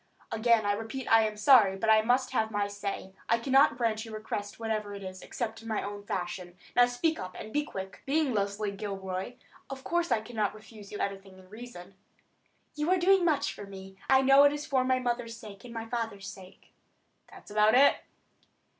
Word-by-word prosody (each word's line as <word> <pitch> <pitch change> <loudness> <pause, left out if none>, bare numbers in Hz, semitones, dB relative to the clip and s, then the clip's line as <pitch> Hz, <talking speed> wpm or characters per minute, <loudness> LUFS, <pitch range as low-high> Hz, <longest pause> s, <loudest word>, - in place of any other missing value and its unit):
"Again 225 -1 +3
I 205 - +2
repeat 225 +5 -5
I 225 -1 +6
am 215 0 -7
sorry, 210 -4 +6
but 220 - -2
I 220 0 +6
must 250 +4 +1
have 220 -4 +1
my 205 -2 -1
say. 200 -1 -5 0.2
I 230 - +4
cannot 265 0 +4
grant 225 -3 0
your 225 -1 -8
request, 205 -1 -5
whatever 215 -2 -3
it 200 - -8
is, 185 0 -8
except 225 -2 -5
in 225 - -11
my 220 -2 -1
own 205 0 -6
fashion. 180 -1 -4 0.2
Now, 245 0 +6
speak 245 +7 0
up, 185 0 -7
and 215 - -8
be 295 - +1
quick. 190 -9 -8
Being 290 -2 +1
Leslie 200 0 -1
Gilroy, 195 +1 -5 0.4
of 270 -1 -7
course 345 0 0
I 220 - +3
cannot 215 -2 -2
refuse 215 -1 -13
you 205 - -5
anything 195 -1 -5
in 185 -1 -17
reason." 215 -4 -10 0.8
"You 300 +2 -2
are 370 - +4
doing 375 +1 +4
much 315 -4 +1
for 205 - -9
me. 190 -1 -10
I 265 0 +6
know 275 +1 +7
it 285 0 +5
is 295 0 -5
for 260 -2 +1
my 255 0 +2
mother's 240 -2 -2
sake 210 -2 -11
and 240 - -9
my 225 0 -4
father's 225 -4 -4
sake." 190 -1 -12 0.5
"That's - - -14
about 215 +2 +4
it." 280 +2 +6
220 Hz, 205 wpm, -29 LUFS, 200-250 Hz, 0.8 s, know